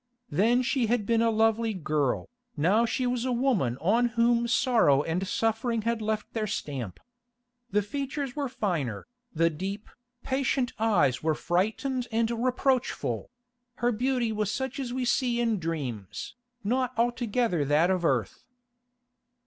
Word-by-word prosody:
Then 235 +6 +3
she 250 -2 +1
had 230 -2 +1
been 230 +1 +2
a 230 - +3
lovely 225 0 +2
girl, 150 -6 0 0.3
now 200 +10 +3
she 255 +2 -1
was 245 -1 0
a 255 - 0
woman 235 - +1
on 230 +8 +3
whom 235 0 +3
sorrow 225 - +3
and 180 +5 -2
suffering 225 +2 0
had 230 0 0
left 215 0 -2
their 220 -2 -1
stamp. 135 - -4 0.7
The 205 +1 +1
features 275 +3 -4
were 285 -3 -2
finer, 165 - -2 0.3
the 165 +1 +2
deep, 195 +6 -5 0.4
patient 260 -1 0
eyes 200 - +2
were 155 0 +1
frightened 220 - -1
and 225 +1 +1
reproachful; 255 +2 0 0.5
her 240 +2 +1
beauty 245 0 0
was 210 -1 -1
such 265 +2 -3
as 255 -3 -3
we 255 0 -2
see 240 -1 +1
in 230 -4 +1
dreams, 135 - -4 0.3
not 255 +3 0
altogether 235 - +1
that 150 +6 +3
of 185 -2 0
earth. 125 - 0
225 Hz, 145 wpm, -28 LUFS, 180-245 Hz, 0.7 s, Then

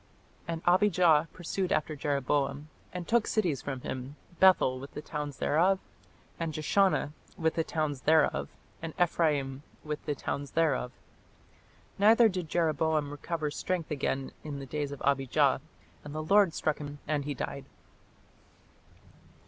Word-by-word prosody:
And 165 -1 -4
Abijah 175 -4 +4
pursued 185 +1 -3
after 155 0 0
Jeroboam, 140 +1 -1 0.2
and 180 -1 -6
took 235 -1 +2
cities 175 -10 0
from 135 -3 -5
him, 130 +3 -5 0.2
Bethel 180 -9 +5
with 140 +2 -10
the 150 - -4
towns 150 -3 -5
thereof, 180 +6 +3 0.6
and 165 -3 -3
Jeshanah 155 -1 +2 0.2
with 160 -1 +1
the 165 - 0
towns 155 -5 -2
thereof, 155 +1 +3 0.3
and 165 -1 -6
Ephraim 145 -6 +1 0.2
with 150 -1 -4
the 150 - -1
towns 140 0 -4
thereof. 140 -6 +2 1.1
Neither 225 +3 +6
did 180 -5 -4
Jeroboam 155 -3 +1
recover 150 +1 -3
strength 175 +1 -3
again 135 -2 -2
in 150 -2 -5
the 135 - -6
days 145 +1 -3
of 140 - -7
Abijah, 135 -2 +2 0.4
and 150 0 -8
the 155 - -2
Lord 195 0 +4
struck 155 - 0
him 145 -1 -7
and 145 -2 0
he 145 -1 -3
died." - - -5
155 Hz, 140 wpm, -30 LUFS, 145-170 Hz, 1.1 s, Neither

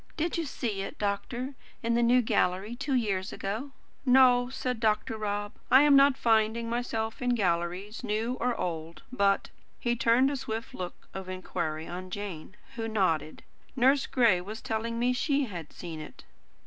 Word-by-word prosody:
Did 330 +2 0
you 335 - -1
see 220 -7 -3
it, 195 - -6
doctor, 235 +6 -2 0.3
in 230 +1 +1
the 235 - +3
New 245 +1 +4
Gallery, 195 +2 0
two 275 +1 -1
years 205 -5 0
ago?" 220 +8 -4 0.3
"No," 250 -2 +5
said 255 -2 -3
Dr. 220 0 +1
Rob. 205 -1 -2 0.2
"I 265 +2 +8
am 295 -1 +6
not 275 -1 +6
finding 225 0 +2
myself 230 -1 -2
in 245 -1 +2
galleries, 185 +2 -1
new 225 +2 -1
or 245 0 0
old. 165 -2 -4
But" 200 -5 +1 0.3
he 240 -2 0
turned 240 +4 +4
a - - -1
swift 225 -2 -5
look 180 -1 -7
of 190 -1 -6
inquiry 160 -4 -3
on 185 +1 -6
Jane, 190 -2 -6 0.2
who 225 -1 -2
nodded 175 -8 0 0.3
"Nurse 265 +2 +4
Gray 230 -8 +3
was 210 +4 -7
telling 230 +1 -3
me 245 +2 +2
she 280 +2 +1
had 175 -9 -7
seen 165 -3 -7
it." 155 - -10
225 Hz, 170 wpm, -29 LUFS, 190-250 Hz, 0.3 s, I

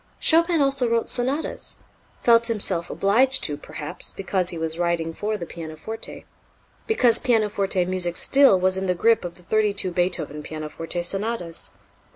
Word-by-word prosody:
Chopin 335 0 +3
also 275 -3 +2
wrote 230 0 0
Sonatas 265 +5 0 0.5
felt 235 -1 +5
himself 190 -6 +1
obliged 255 +7 +2
to, 145 - -1
perhaps, 150 0 -4
because 190 -1 -1
he 170 - -4
was 160 +1 -4
writing 170 -2 -1
for 210 +4 -3
the 175 - -6
pianoforte, 165 +7 -7 0.6
because 245 - +4
pianoforte 210 -6 +1
music 180 -1 0
still 270 -9 +4
was 185 +1 +2
in 190 - -3
the 180 - +1
grip 225 +5 +3
of 175 -1 -6
the 180 - -17
thirty 210 +2 +1
two 185 -2 0
Beethoven 170 -4 -1
pianoforte 155 +3 -3
sonatas. 195 -2 -3
190 Hz, 155 wpm, -23 LUFS, 170-230 Hz, 0.6 s, felt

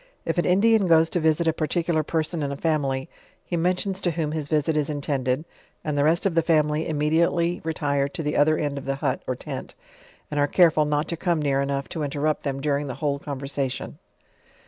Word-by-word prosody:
If - - 0
an - - +1
Indian 200 +2 +4
goes 165 -1 +4
to 175 - +1
visit 160 +1 +2
a 160 - +3
particular 165 +1 0
person 160 +1 -2
in 140 -1 -2
a 140 - -4
family, 140 -4 0 0.4
he 175 - -3
mentions 185 +3 0
to 175 - +1
whom 160 -2 -2
his 155 -2 -2
visit 155 +1 +1
is 150 -1 0
intended, 140 -1 -1 0.4
and 150 -1 -2
the 145 - +2
rest 165 +5 +2
of 195 - +2
the 165 - +3
family 155 -1 +1
immediately 165 +3 +1
retire 145 -3 0
to 165 +3 -4
the 150 0 -1
other 155 +2 +4
end 145 -2 -2
of 135 - -11
the 135 0 -1
hut 135 - -1
or - - -1
tent, - - -7 0.6
and 150 - -1
are 145 - +3
care:ul 160 -2 +4
not 150 +1 0
to 170 - -2
come 170 -1 0
near 140 -2 +1
enough 140 0 -2
to 160 - -4
in 145 - -1
terrupt 150 +2 -1
them 135 -1 -3
during 145 0 0
the 130 - -5
whole 140 -2 -1
conversation. 140 -2 -4
155 Hz, 215 wpm, -24 LUFS, 140-165 Hz, 0.6 s, Indian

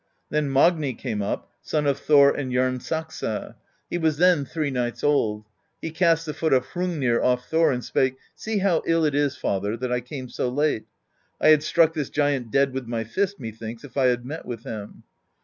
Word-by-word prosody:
Then 150 -1 0
Magni 145 -1 +3
came 105 -1 -3
up, 100 - -3
son 150 -1 -1
of 140 -1 +1
Thor 140 -1 +6
and 135 -3 -3
Jarnsaxa: 130 0 -2 0.3
he 175 - -3
was 160 -3 +1
then 175 -4 +4
three 150 0 -2
nights 120 -2 -2
old; 110 -8 +1 0.3
he 165 - -5
cast 165 -1 +2
the 150 - -4
foot 160 -1 0
of 130 -1 +3
Hrungnir 160 -10 0
off 125 0 +1
Thor, 165 -1 +3
and 125 -2 -3
spake: 130 -1 +1 0.2
'See 220 -1 -3
how 190 -4 +2
ill 165 -1 +3
it 150 - +1
is, 145 -1 +1
father, 100 +3 -1
that 125 +1 -3
I 125 0 0
came 130 +1 -7
so 125 - -2
late: 145 -3 0 0.5
I - - +4
had 155 -1 +7
struck 160 +1 +3
this 150 -4 -3
giant 145 -5 0
dead 140 +3 +2
with 130 -2 -4
my 115 -1 -2
fist, 195 - -2
methinks, 115 0 -7
if 145 - -12
I 135 -2 +3
had 120 -1 +1
met 155 +5 -6
with 120 -2 -6
him.' 105 -2 -8
140 Hz, 200 wpm, -24 LUFS, 125-160 Hz, 0.5 s, had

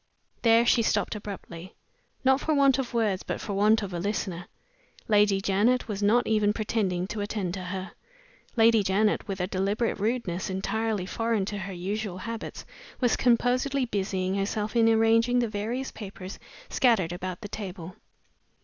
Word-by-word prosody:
There 230 0 +5
she 240 - +4
stopped 220 - +1
abruptly 190 -4 -8 0.5
not 265 +1 +4
for 310 - +1
want 275 -1 +4
of 255 -3 -3
words, 215 -5 0
but - - -4
for 205 - -4
want 210 +2 +3
of 190 -2 -5
a 175 - -2
listener. 180 -2 -3 0.6
Lady 205 -2 +4
Janet 210 +6 +2
was 205 -2 -4
not 230 +4 +3
even 210 -1 +2
pretending 210 -5 -1
to 210 +2 -4
attend 205 -3 -3
to 185 -1 -5
her. 185 +1 -5 0.6
Lady 225 -1 +5
Janet, 205 +2 +1
with 195 -1 -4
a 180 - +1
deliberate 200 +5 -1
rudeness 205 -5 -1
entirely 205 +1 -1
foreign 225 0 -1
to 205 +1 -4
her 195 0 -5
usual 190 +2 -3
habits, 230 +4 -6 0.3
was 245 -3 +3
composedly 255 +2 +2
busying 190 -4 -1
herself 210 +3 -2
in 225 -1 +5
arranging 225 +2 +4
the 240 -1 +2
various 225 +5 -3
papers 195 -3 -8 0.3
scattered 225 - +2
about 180 +1 -5
the 210 - -6
table. 185 -4 -7
210 Hz, 160 wpm, -27 LUFS, 190-230 Hz, 0.6 s, There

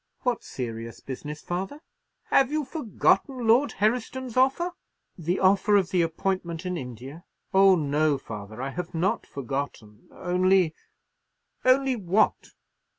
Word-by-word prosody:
"What 245 -3 -1
serious 115 -2 -6
business, 150 +3 -7
father?" 190 +11 -4 0.5
"Have 270 0 +4
you 305 -1 0
forgotten 255 - 0
Lord 245 +6 +4
Herriston's 240 +4 -1
offer?" 270 +8 +2 0.4
"The 175 +2 -1
offer 200 +2 +4
of 195 -1 +2
the 180 - +3
appointment 170 +1 -2
in 180 0 -2
India? 130 +3 -8 0.3
Oh, 195 0 +7
no, 150 -1 +1
father, 110 -1 -8
I 135 - -3
have 175 +2 -6
not 190 +7 0
forgotten, 135 -5 -5
only——" 180 -1 +2 0.9
"Only 260 0 +4
what?" 200 0 +1
180 Hz, 125 wpm, -26 LUFS, 145-230 Hz, 0.9 s, Oh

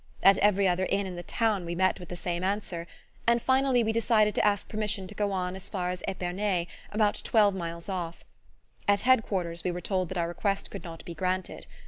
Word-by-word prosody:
At 195 0 +7
every 200 -1 +4
other 185 +1 +1
inn 200 0 +1
in 185 -1 -5
the 175 - -5
town 215 0 0
we 170 0 -4
met 185 +2 +2
with 180 - -10
the 180 - -5
same 175 0 -3
answer; 185 -3 -2 0.4
and 235 0 +5
finally 260 0 +3
we 220 - +1
decided 220 -2 +3
to - - +1
ask 205 -1 +2
permission 210 -3 -1
to 195 - -9
go 205 0 -1
on 185 -1 -2
as 190 - -7
far 180 -3 -1
as 180 - -5
Epernay, 185 -1 -1 0.3
about 210 -1 +1
twelve 210 -3 +4
miles 170 -2 -5
off. 175 -4 -4 0.6
At 200 0 +4
Head 255 -1 +5
quarters 170 -5 -2
we - - 0
were 175 0 -3
told 185 0 -1
that 185 - -4
our 170 -1 +1
request 195 +3 -2
could 200 - -7
not 165 -2 -9
be 170 - -6
granted. 185 +2 -2
190 Hz, 220 wpm, -28 LUFS, 175-210 Hz, 0.6 s, At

